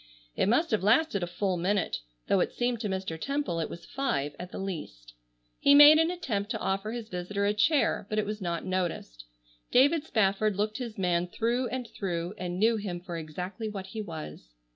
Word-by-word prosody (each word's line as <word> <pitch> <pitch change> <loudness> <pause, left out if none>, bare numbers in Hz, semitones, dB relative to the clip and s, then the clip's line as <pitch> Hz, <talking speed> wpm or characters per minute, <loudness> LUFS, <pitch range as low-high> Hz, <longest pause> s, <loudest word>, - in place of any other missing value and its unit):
It - - +2
must 315 +8 +2
have 215 - +2
lasted 215 +1 +3
a 175 - -1
full 180 +1 -1
minute, 185 - 0 0.3
though 195 - +2
it - - +1
seemed 240 -1 -1
to 210 -2 -2
Mr. 190 -4 -4
Temple 275 -12 -1
it 160 - -2
was 170 0 -9
five 145 - -2
at 180 +1 -7
the - - -7
least. 105 - -6 0.5
He 280 - +6
made 295 +2 +10
an 325 +1 +3
attempt 230 - -2
to - - -1
offer 195 +3 -1
his 235 -2 -5
visitor 200 +2 -2
a 205 - +2
chair, 215 -1 +2
but 215 - -2
it 215 - +1
was 210 0 -4
not 170 -2 -2
noticed. 175 - -3 0.5
David 285 +5 +4
Spafford 215 -5 +1
looked 215 +3 -1
his 235 -4 -6
man 180 -2 +1
through 235 +7 0
and 250 -1 -4
through, 175 -4 -3
and 180 -1 -3
knew 225 +3 +3
him 190 -4 -4
for 175 -1 -7
exactly 180 +7 -5
what 195 -2 -6
he 215 +3 -6
was. 155 - -8
200 Hz, 205 wpm, -29 LUFS, 175-230 Hz, 0.5 s, made